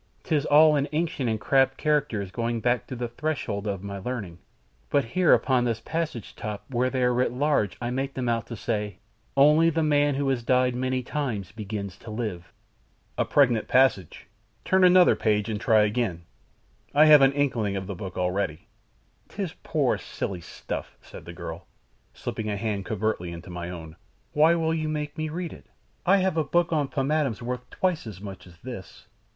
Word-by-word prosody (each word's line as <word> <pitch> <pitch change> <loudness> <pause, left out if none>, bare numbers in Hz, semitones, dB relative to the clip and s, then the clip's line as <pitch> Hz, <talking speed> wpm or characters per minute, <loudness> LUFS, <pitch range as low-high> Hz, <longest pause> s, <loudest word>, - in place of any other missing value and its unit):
'Tis 150 -3 0
all 150 +1 +6
in 140 0 0
ancient 150 -6 -1
and 110 -1 -1
crabbed 135 +2 +2
characters 140 -11 0
going 115 +1 -2
back 120 +1 0
to 130 - -6
the 120 0 -3
threshold 115 -6 -3
of 100 -2 -3
my 100 -1 -5
learning, 100 -6 -5 0.5
but 140 -3 +2
here 175 +9 +2
upon 130 -2 +4
this 115 -2 -1
passage 160 -5 -4
top 105 -2 -5
where 125 +1 +1
they 130 -1 -1
are 125 0 +3
writ 125 0 +1
large 130 -6 0
I 120 0 -3
make 135 +2 -2
them 130 -2 -2
out 115 -1 0
to 115 - -6
say, 105 -4 -3 0.4
'ONLY 150 +4 +6
THE 165 0 0
MAN 145 -2 +3
WHO 140 0 -1
HAS 130 -3 0
DIED 125 +1 +2
MANY 130 +1 -1
TIMES 120 -9 -3
BEGINS 105 -3 -6
TO 115 - -12
LIVE.'" 105 -6 -5 0.6
"A - - +1
pregnant 125 -6 +3
passage! 130 -9 +2 0.4
Turn 190 0 +3
another 180 0 +7
page, 105 -1 +1
and 105 -1 -3
try 110 -3 +4
again; 105 -5 -1 0.7
I 150 +2 +7
have 150 -2 +8
an 135 0 +5
inkling 125 -8 0
of 95 -1 -3
the 100 - -5
book 95 0 -7
already." 90 -3 -1 0.6
"'Tis - - -4
poor, - - 0
silly 90 -3 -5
stuff," - - -7
said - - -12
the - - -8
girl, - - -8 0.4
slipping 110 -1 -5
a 100 - -2
hand 100 -2 -2
covertly 105 -5 -2
into 85 +1 -9
my 85 0 -5
own. 80 -3 -8 0.4
"Why 155 +3 +5
will 160 -1 0
you 155 -1 -1
make 150 -1 -3
me 155 0 -3
read 170 +2 -4
it? - - -15 0.4
I 195 +2 +6
have 185 -3 +1
a 160 - +3
book 170 +4 +1
on 150 -3 +1
pomatums 135 -5 -1
worth 125 +1 -5
twice 180 -9 -1
as 100 -5 -8
much 95 -2 -9
as 90 -1 -16
this." 120 -8 -9
125 Hz, 190 wpm, -26 LUFS, 105-145 Hz, 0.7 s, have